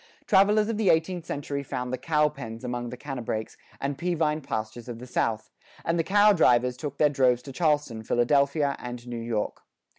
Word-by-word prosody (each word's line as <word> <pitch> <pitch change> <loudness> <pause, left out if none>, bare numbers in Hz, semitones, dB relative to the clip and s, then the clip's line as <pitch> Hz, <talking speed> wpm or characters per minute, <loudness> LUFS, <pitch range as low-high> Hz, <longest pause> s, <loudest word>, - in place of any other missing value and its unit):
Travelers 210 +2 +4
of 225 -2 -2
the 215 -3 +2
eighteenth 170 +1 +1
century 140 0 -3
found 125 -2 -4
the - - 0
"cowpens" 150 -7 -1
among 120 -1 -3
the 125 - -7
canebrakes 120 -5 -4 0.2
and 140 0 -3
peavine 160 -3 0
pastures 110 -1 -5
of 120 - -5
the 125 - -9
South, 110 -3 -1 0.3
and 165 0 +1
the - - +3
"cow 205 +3 +5
drivers" 125 -7 +3
took 140 +2 -6
their 150 - +5
droves 130 -3 +2
to 140 - -8
Charleston, 145 -6 0
Philadelphia, 140 +5 +2
and 120 0 -7
New 120 -1 -5
York. 115 -2 -3
140 Hz, 180 wpm, -27 LUFS, 120-160 Hz, 0.3 s, cow